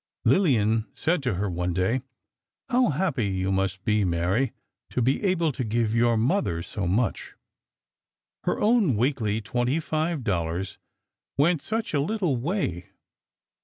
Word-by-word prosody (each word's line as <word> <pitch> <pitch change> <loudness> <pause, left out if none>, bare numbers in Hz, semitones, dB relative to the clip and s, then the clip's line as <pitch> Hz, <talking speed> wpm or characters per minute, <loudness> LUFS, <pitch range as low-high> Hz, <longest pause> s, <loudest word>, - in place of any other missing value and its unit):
Lillian 115 - +3
said 170 0 0
to 125 -7 -1
her, 100 +3 -1
one 90 -1 -2
day: 95 +8 +1 0.7
"How 250 0 +3
happy 150 - 0
you 95 0 -1
must 95 0 -1
be, 105 0 +2
Mary, 90 +8 +1 0.4
to - - -2
be 130 - +1
able 175 -5 +2
to 130 - -3
give 110 0 0
your 115 0 +3
mother 115 - 0
so 95 0 -4
much." 110 +5 -1 1.1
Her - - 0
own 210 - +3
weekly 110 -3 0
twenty 120 +8 0
five 155 -2 -1
dollars 90 -2 -2 0.6
went 155 +3 +3
such 225 -3 -3
a 145 - +2
little 180 -3 0
way. 120 - -2
120 Hz, 140 wpm, -26 LUFS, 95-160 Hz, 1.1 s, Lillian